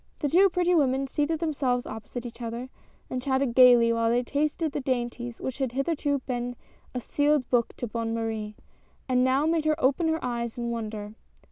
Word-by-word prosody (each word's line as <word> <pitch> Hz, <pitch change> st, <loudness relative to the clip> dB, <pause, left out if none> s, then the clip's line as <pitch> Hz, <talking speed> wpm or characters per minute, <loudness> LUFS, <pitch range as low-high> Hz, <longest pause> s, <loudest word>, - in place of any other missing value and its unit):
The 290 Hz, -, -1 dB
two 380 Hz, +6 st, +5 dB
pretty 360 Hz, 0 st, +1 dB
women 275 Hz, -4 st, +2 dB
seated 295 Hz, +4 st, -1 dB
themselves 270 Hz, -6 st, 0 dB
opposite 220 Hz, +3 st, -7 dB
each 240 Hz, 0 st, -9 dB
other, 235 Hz, +2 st, -5 dB, 0.4 s
and 255 Hz, -, -3 dB
chatted 265 Hz, -1 st, 0 dB
gayly 240 Hz, -2 st, +7 dB
while 230 Hz, 0 st, +1 dB
they 240 Hz, +2 st, +2 dB
tasted 300 Hz, +4 st, -1 dB
the 285 Hz, -, -3 dB
dainties 240 Hz, -2 st, -3 dB
which 260 Hz, 0 st, -5 dB
had 260 Hz, -3 st, -1 dB
hitherto 285 Hz, +1 st, 0 dB
been 245 Hz, -1 st, -3 dB, 0.4 s
a -, -, 0 dB
sealed 290 Hz, +1 st, +1 dB
book 240 Hz, -2 st, +1 dB
to -, -, -3 dB
Bonne 230 Hz, 0 st, -3 dB
Marie, 220 Hz, -2 st, -3 dB, 0.5 s
and 250 Hz, -1 st, +3 dB
now 265 Hz, +3 st, +2 dB
made 320 Hz, -1 st, +1 dB
her 310 Hz, 0 st, +2 dB
open 285 Hz, +4 st, +2 dB
her 320 Hz, 0 st, -1 dB
eyes 235 Hz, 0 st, -3 dB
in 235 Hz, -1 st, -2 dB
wonder. 215 Hz, -2 st, -5 dB
255 Hz, 190 wpm, -27 LUFS, 235-290 Hz, 0.5 s, gayly